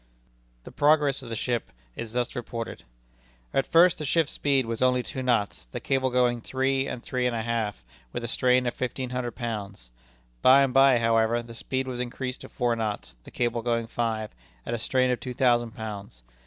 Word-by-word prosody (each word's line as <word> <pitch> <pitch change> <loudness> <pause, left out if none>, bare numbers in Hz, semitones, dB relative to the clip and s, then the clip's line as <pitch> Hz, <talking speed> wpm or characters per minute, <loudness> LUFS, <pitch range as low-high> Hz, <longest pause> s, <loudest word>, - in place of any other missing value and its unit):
The - - -10
progress 145 -2 +3
of - - -9
the - - -4
English - - -3
ship 120 -2 -2 0.2
is 115 -1 -6
thus 125 0 -1
reported: 115 -1 -5 0.7
"At 135 - +1
first, 170 +1 +5
the - - -3
ship's 155 +1 +1
speed 140 -3 +1
was 115 0 -3
only 125 -1 +3
two 130 0 -5
knots, 115 - 0
the - - -6
cable 130 -1 +1
going 125 -1 +2
three 135 +2 0
and 120 - -5
three 125 -1 -1
and 120 - -1
a 110 - -2
half, 110 - -2 0.3
with 120 - -4
a - - -2
strain 125 +2 +2
of 120 - 0
fifteen 125 0 -3
hundred 125 -1 -3
pounds. 100 - -5 0.5
By 135 +2 +7
and 135 -2 0
by, 135 -1 +6
however, 115 0 +2
the 115 0 -11
speed 130 +3 -2
was 125 -1 -4
increased 125 +1 -4
to - - -9
four 120 -2 0
knots, 105 - -4
the - - -10
cable 120 -1 -1
going 115 0 0
five, 115 -2 -2 0.3
at - - -3
a 120 - -1
strain 130 +2 +2
of 125 - -1
two 125 -1 -6
thousand 120 -3 +2
pounds. 100 - -7
120 Hz, 205 wpm, -27 LUFS, 115-130 Hz, 0.7 s, By